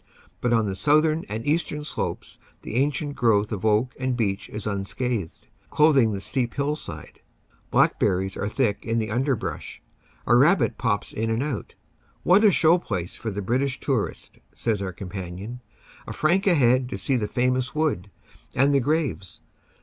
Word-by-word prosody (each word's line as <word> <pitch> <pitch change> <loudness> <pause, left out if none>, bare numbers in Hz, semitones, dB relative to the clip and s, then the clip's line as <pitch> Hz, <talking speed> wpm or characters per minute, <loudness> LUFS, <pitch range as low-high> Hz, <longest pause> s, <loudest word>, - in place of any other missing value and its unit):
But 120 - 0
on 115 -2 +3
the 100 - -2
southern 155 - +2
and 110 +2 -4
eastern 150 -1 0
slopes 150 - -5 0.2
the - - -7
ancient 145 +3 0
growth 110 -3 +2
of 100 -4 -4
oak 110 +4 +2
and 130 -1 -1
beech 100 -4 -1
is 105 0 -6
unscathed, 100 -1 -3 0.2
clothing 140 -7 +4
the 100 - -3
steep 120 +3 -2
hillside. 140 - -4 0.5
Black - - +3
berries 95 0 0
are 100 - -2
thick 105 -4 0
in 115 0 -1
the 110 -1 -1
underbrush. 130 +1 -2 0.5
A 120 - +4
rabbit 150 +10 +4
pops 105 -5 -1
in 110 +1 -2
and 115 +3 0
out. 140 -7 -4 0.5
"What 195 +5 +5
a 215 - +8
show 170 0 +4
place 95 - -4
for 115 - -5
the 100 -1 -4
British 130 +6 0
tourist," 130 -7 -3
says 110 -4 -1
our 95 -1 -3
com 90 +1 -8
panion. 95 +5 -6 0.5
"A - - -5
franc 180 +6 +2
a 180 - +5
head 125 -2 +3
to 95 - -4
see 115 +8 0
the 110 -4 0
famous 125 +3 0
wood 145 - 0 0.5
and 140 +3 +4
the 140 - +4
graves. 140 - -2
120 Hz, 170 wpm, -24 LUFS, 105-140 Hz, 0.5 s, a